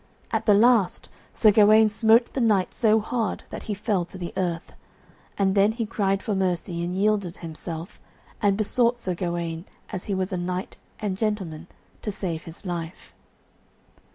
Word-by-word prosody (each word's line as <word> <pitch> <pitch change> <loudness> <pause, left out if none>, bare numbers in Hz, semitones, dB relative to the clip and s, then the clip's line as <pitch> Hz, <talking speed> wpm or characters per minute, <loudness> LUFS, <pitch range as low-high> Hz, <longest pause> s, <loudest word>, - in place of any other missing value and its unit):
At 220 0 -1
the 205 - +7
last 225 -3 +3 0.2
Sir 215 - +5
Gawaine 215 +1 +6
smote 225 +3 +4
the 265 - -1
knight 210 -5 +2
so 220 -1 +3
hard 225 +1 -2
that - - -6
he 210 - 0
fell 200 -2 0
to 185 - -11
the 175 -2 -6
earth; 175 -3 -2 0.6
and 195 -1 +2
then 205 +2 +4
he 230 0 -2
cried 195 -2 0
for 215 - -1
mercy 180 -2 -1
and 175 +1 -3
yielded 200 -3 +1
himself, 165 +2 -7 0.4
and 200 -2 +3
besought 235 +3 +2
Sir 190 -6 -3
Gawaine 170 -1 -3 0.2
as 185 - -6
he 200 - -1
was 190 +1 -2
a - - 0
knight 180 +1 -4 0.2
and 200 -3 -3
gentleman 185 -7 -2 0.3
to 210 - -3
save 175 -5 -4
his 165 +4 -11
life. 170 -2 -6
195 Hz, 170 wpm, -25 LUFS, 175-215 Hz, 0.6 s, the